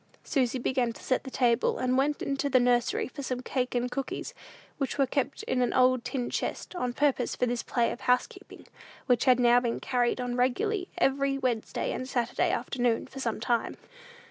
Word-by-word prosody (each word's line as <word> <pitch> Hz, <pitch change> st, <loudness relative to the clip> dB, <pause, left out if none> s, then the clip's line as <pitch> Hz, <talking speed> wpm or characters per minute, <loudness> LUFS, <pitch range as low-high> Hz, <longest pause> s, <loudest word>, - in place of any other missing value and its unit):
Susy 260 Hz, -2 st, 0 dB
began 250 Hz, -1 st, 0 dB
to -, -, -13 dB
set 255 Hz, -, 0 dB
the -, -, -5 dB
table, 240 Hz, -3 st, +2 dB
and 255 Hz, 0 st, 0 dB
went 285 Hz, +3 st, +1 dB
into 280 Hz, +1 st, -1 dB
the 255 Hz, -1 st, +5 dB
nursery 245 Hz, -1 st, +2 dB
for 280 Hz, -, -8 dB
some 255 Hz, -2 st, -3 dB
cake 255 Hz, -1 st, -2 dB
and 245 Hz, +1 st, 0 dB
cookies, 275 Hz, 0 st, -4 dB, 0.5 s
which 275 Hz, 0 st, -2 dB
were 275 Hz, -, +4 dB
kept 275 Hz, +1 st, -2 dB
in 250 Hz, -, 0 dB
an 245 Hz, -, +1 dB
old 255 Hz, -1 st, +4 dB
tin 250 Hz, -4 st, -3 dB
chest, -, -, -3 dB
on 250 Hz, -9 st, -2 dB
purpose 265 Hz, -2 st, +1 dB
for -, -, +1 dB
this 240 Hz, 0 st, -1 dB
play 235 Hz, -1 st, 0 dB
of -, -, -7 dB
housekeeping, 250 Hz, 0 st, -1 dB, 0.4 s
which 245 Hz, -2 st, +2 dB
had 255 Hz, -2 st, +5 dB
now 240 Hz, 0 st, +6 dB
been 240 Hz, -2 st, -2 dB
carried 245 Hz, -1 st, 0 dB
on 245 Hz, -1 st, -2 dB
regularly 360 Hz, -, 0 dB
every 275 Hz, 0 st, +1 dB
Wednesday 250 Hz, -5 st, -1 dB
and 255 Hz, -, -4 dB
Saturday 240 Hz, -3 st, 0 dB
afternoon, 245 Hz, -3 st, 0 dB
for 270 Hz, -, -10 dB
some 230 Hz, -5 st, -2 dB
time. 235 Hz, 0 st, -1 dB
250 Hz, 195 wpm, -28 LUFS, 245-270 Hz, 0.5 s, now